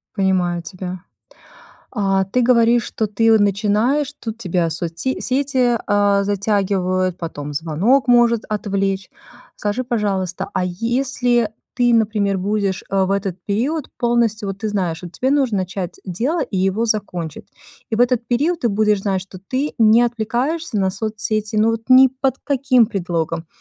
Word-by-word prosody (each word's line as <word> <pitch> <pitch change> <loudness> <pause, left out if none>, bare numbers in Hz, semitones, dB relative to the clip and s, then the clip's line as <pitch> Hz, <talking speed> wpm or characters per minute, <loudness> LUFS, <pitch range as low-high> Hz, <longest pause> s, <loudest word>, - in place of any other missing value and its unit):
Понимаю 185 -3 +1
тебя. 185 +1 -7 0.9
А 195 -2 +1
ты 225 +7 0
говоришь, 235 -1 +4
что 220 - -2
ты, 225 +2 +2
о, - - +5
начинаешь, 215 +8 +1
тут 225 -1 -6
тебя 180 -6 0
соцсе 165 +10 -3
сети, 260 -2 +1
э, 205 -1 +3
затягивают, 190 -3 0
потом 150 -3 -6
звонок 170 - +1
может 240 -2 +4
отвлечь. 195 -2 -2 0.5
Скажи, 210 +5 -2
пожалуйста, 200 -6 -2
а - - 0
если 240 +4 0 0.2
ты, 245 -1 +3
например, 210 -3 +1
будешь, 200 0 -1
э, 195 -1 +2
в 190 - -3
этот 195 -2 -1
период 260 +9 -1
полностью 235 -3 +1
вот 195 - -4
ты 220 - -3
знаешь, 180 -5 -2
вот 175 -1 -8
тебе 260 +7 -1
нужно 265 -7 +2
начать 185 -1 -4
дело 245 - -1
и 195 - -4
его 195 +5 +1
закончить. 180 -7 -3 0.4
И 220 - 0
в - - -1
этот 245 -1 +2
период 305 +8 0
ты 235 - +1
будешь 210 -1 +1
знать, 195 -2 0
что 185 0 -11
ты 270 +6 -2
не 225 0 +6
отвлекаешься 240 +5 -1
на 190 -1 +2
соцсети, 215 +1 -3
ну, 215 +2 +4
вот 225 0 -3
ни 260 +1 +8
под 265 +1 -2
каким 260 -4 +3
предлогом. 165 -4 -3
210 Hz, 155 wpm, -19 LUFS, 190-240 Hz, 0.9 s, ни